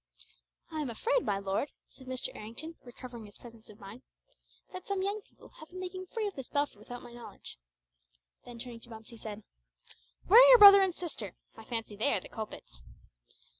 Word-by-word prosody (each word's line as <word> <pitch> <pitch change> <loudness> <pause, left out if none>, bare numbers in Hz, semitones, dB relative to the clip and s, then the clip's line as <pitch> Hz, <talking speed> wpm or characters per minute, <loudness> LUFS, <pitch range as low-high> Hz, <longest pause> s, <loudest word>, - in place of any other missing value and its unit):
"I 310 -1 -3
am 285 - -3
afraid 485 - +1
my 200 - 0
lord," 195 +8 -2 0.2
said 260 - -17
Mr. 255 -1 -3
Errington, 230 +10 -7
recovering 240 -2 -10
his 205 - -13
presence 230 -2 -14
of 210 - -15
mind, 200 +5 -11 0.7
"that 370 -1 -8
some 395 -1 -1
young 405 +2 -2
people - - -19
have 310 - -12
been 370 - -9
making 370 0 -6
free 445 +3 -3
of 405 - -3
this 270 -6 -8
belfry 285 -7 -1
without 245 +3 -9
my 240 - -12
knowledge." 240 - -11 0.8
Then 245 -1 -11
turning 235 -1 -8
to 235 - -13
Bumps 225 0 -11
he 230 - -11
said, 215 -1 -8 0.8
"Where 445 +7 +9
are - - +8
your - - +10
brother 400 -2 +11
and 375 -3 +1
sister? 240 - -6 0.2
I 225 - -12
fancy 225 -3 -4
they 225 +8 +1
are - - +1
the - - -12
culprits." 60 - -8
245 Hz, 200 wpm, -31 LUFS, 220-365 Hz, 0.8 s, brother